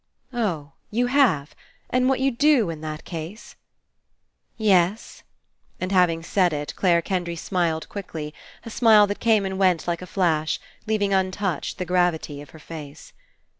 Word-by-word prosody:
"Oh! 170 -12 -2 0.2
You 240 +3 +1
have! 245 - +2 0.4
And 255 +1 +2
what 265 - +1
you'd 265 -3 0
do 275 - +4
In 155 -2 -8
that 155 0 -6
case?" 170 +5 -8 1.0
"Yes." 200 -1 +1 0.6
And 185 +1 -3
having 175 -3 +3
said 180 -1 +2
it, 145 0 -4
Clare 170 -3 +3
Ken 185 0 -1
dry 170 0 -5
smiled 170 -2 -1
quickly, 160 -7 -6 0.3
a 230 - -7
smile 215 -3 +6
that 205 0 -4
came 220 -4 +3
and 190 0 -3
went 180 -4 +2
like 170 0 -1
a 180 - -8
flash, 160 -5 0 0.3
leaving 205 -2 +1
untouched 190 -1 -1
the 180 - -3
gravity 175 -5 0
of 145 - -12
her 160 - -14
face. 150 -1 -10
180 Hz, 160 wpm, -24 LUFS, 160-210 Hz, 1.0 s, smile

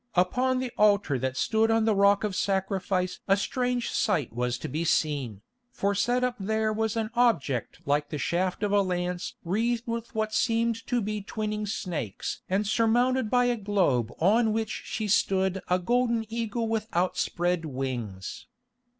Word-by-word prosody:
Upon 250 +9 +2
the 255 -1 -2
altar 200 -10 +3
that 130 +1 -2
stood 220 +6 +2
on 225 -1 +3
the 220 - +3
Rock 200 0 +4
of 205 -3 -1
Sacrifice 190 -2 -1
a 195 0 +4
strange 245 +3 -1
sight 160 - 0
was 125 +1 -1
to - - -6
be 155 +5 -2
seen, 140 -10 0 0.3
for 200 -4 -1
set 245 +5 +1
up 250 -1 0
there 220 +2 0
was 220 0 -1
an 220 0 -2
object 225 - +1
like 145 +1 +1
the 150 - -3
shaft 180 +6 -1
of 205 - +1
a 205 0 +4
lance 180 -1 -2
wreathed 230 +6 0
with 235 +1 -5
what 215 0 -1
seemed 230 -1 +1
to 245 -1 +1
be 210 0 -3
twining 210 +1 -3
snakes 165 - -4
and 195 +3 +1
surmounted 235 +3 +2
by 245 +1 +3
a 245 0 +2
globe 190 - +1
on 220 +5 +3
which 220 0 -3
stood 190 -1 +2
a 180 - +4
golden 235 +4 +1
eagle 230 0 -2
with 220 -1 -1
outspread 175 -1 0
wings. 125 -9 -5
205 Hz, 165 wpm, -27 LUFS, 175-225 Hz, 0.3 s, Rock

